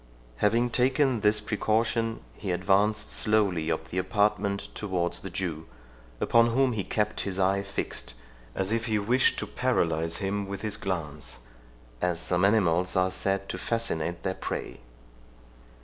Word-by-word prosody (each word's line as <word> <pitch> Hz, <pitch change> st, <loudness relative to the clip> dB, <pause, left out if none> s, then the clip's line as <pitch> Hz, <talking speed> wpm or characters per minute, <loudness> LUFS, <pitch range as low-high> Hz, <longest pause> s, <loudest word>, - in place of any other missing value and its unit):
Having 115 Hz, -, +2 dB
taken 130 Hz, 0 st, +2 dB
this 105 Hz, 0 st, +3 dB
precaution, 110 Hz, +2 st, 0 dB
he 100 Hz, -, -6 dB
advanced 100 Hz, +4 st, +1 dB
slowly 100 Hz, -7 st, +2 dB
up 80 Hz, 0 st, -3 dB
the 95 Hz, -, -1 dB
apartment 100 Hz, +1 st, 0 dB
towards 90 Hz, -4 st, -2 dB
the 95 Hz, -, -6 dB
Jew, 85 Hz, -4 st, -4 dB, 0.5 s
upon 115 Hz, 0 st, +4 dB
whom 135 Hz, -1 st, +3 dB
he 105 Hz, -3 st, -2 dB
kept 105 Hz, +3 st, -1 dB
his 95 Hz, -2 st, -2 dB
eye 95 Hz, +1 st, +2 dB
fixed, 95 Hz, -10 st, -4 dB, 0.4 s
as 95 Hz, +1 st, -1 dB
if 115 Hz, 0 st, 0 dB
he 110 Hz, -2 st, +1 dB
wished 120 Hz, +5 st, +2 dB
to -, -, -2 dB
paralyze 80 Hz, +1 st, 0 dB
him 100 Hz, 0 st, -2 dB
with 100 Hz, +2 st, -6 dB
his 105 Hz, -2 st, -1 dB
glance, 75 Hz, -6 st, -5 dB, 0.6 s
as 90 Hz, -2 st, 0 dB
some 90 Hz, 0 st, 0 dB
animals 95 Hz, -4 st, +3 dB
are 95 Hz, 0 st, +2 dB
said 95 Hz, +1 st, -1 dB
to -, -, -4 dB
fascinate 85 Hz, -8 st, -1 dB
their 95 Hz, -, 0 dB
prey. -, -, -5 dB
100 Hz, 150 wpm, -27 LUFS, 90-110 Hz, 0.6 s, upon